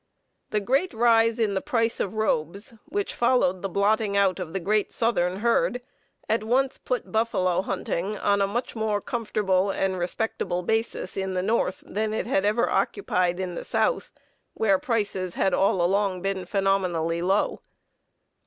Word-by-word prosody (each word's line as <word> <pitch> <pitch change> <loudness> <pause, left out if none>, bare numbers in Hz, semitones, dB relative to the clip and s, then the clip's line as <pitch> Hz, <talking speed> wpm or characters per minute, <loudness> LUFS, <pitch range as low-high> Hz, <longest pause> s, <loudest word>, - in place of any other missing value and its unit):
The 210 - +1
great 265 - 0
rise 230 -1 +4
in 220 -4 +1
the 190 - -1
price 230 -5 0
of 200 +2 -2
robes 200 - -1
which 405 0 -2
followed 235 -7 +2
the 195 - -3
blotting 200 +2 +1
out 195 -2 +2
of 175 -3 -5
the 190 - -2
great 210 +4 0
southern 190 -5 0
herd 235 +1 +2 0.5
at 220 0 +1
once 260 +4 +1
put 250 - -3
buffalo 185 -6 +1
hunting 195 +1 -3
on 200 0 +1
a 195 - +3
much 240 +5 -3
more 220 -2 0
comfortable 205 -4 0
and 190 -1 -1
respectable 180 -1 -2
business 225 +5 -1
basis - - -7
in 190 -1 -2
the 180 - 0
North 200 -3 0
than 215 +1 -2
it - - -2
had 205 -5 +1
ever 215 +3 +2
occupied 180 - 0
in 185 -2 -3
the - - -5
South, - - 0 0.4
where 200 -4 +2
prices 205 -6 -2
had 190 - +1
all 195 -2 +2
along 190 0 +1
been 195 -2 -2
phenomenally 180 -4 0
low. 190 +4 +1
200 Hz, 165 wpm, -25 LUFS, 185-225 Hz, 0.5 s, rise